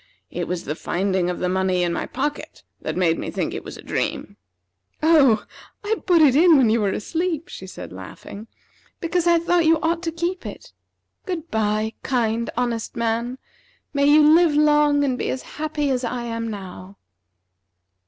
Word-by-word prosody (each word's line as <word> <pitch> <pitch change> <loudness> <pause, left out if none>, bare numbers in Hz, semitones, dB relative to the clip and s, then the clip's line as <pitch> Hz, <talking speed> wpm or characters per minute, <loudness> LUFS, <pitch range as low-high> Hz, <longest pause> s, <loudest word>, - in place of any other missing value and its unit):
It - - -3
was 180 -1 -3
the 150 - -2
finding 185 +2 -1
of 180 - -3
the 180 - -1
money 185 -1 +1
in 170 -1 0
my - - -3
pocket 290 +3 -4 0.2
that - - -4
made 170 -3 +2
me - - -4
think - - -3
it - - -5
was - - -9
a - - -12
dream." - - -3 0.7
"Oh, 275 -10 +5 0.4
I 435 +2 0
put 340 -4 +5
it 270 -4 +5
in 330 +1 +6
when 245 -5 +4
you 230 0 +2
were 200 - +1
asleep," 330 - -2
she - - -9
said, - - -9
laughing, 210 +3 -10 0.5
"because 340 +1 0
I 340 0 +5
thought 340 0 +2
you 325 0 +4
ought 335 +1 0
to 335 -2 -2
keep 345 +3 -3
it. - - -9 0.5
Good 340 -3 -4
by, 215 0 0
kind, 235 -3 0
honest 240 -2 -2
man. 235 +2 -1 0.6
May 280 -1 +2
you 300 +1 +6
live 320 0 +5
long, 295 -1 +4
and 255 -3 0
be - - -2
as 260 - -3 0.2
happy 300 -2 -1
as 255 -1 -1
I 240 0 -3
am 230 -1 -4
now." 195 -1 -9
260 Hz, 185 wpm, -22 LUFS, 215-320 Hz, 0.7 s, in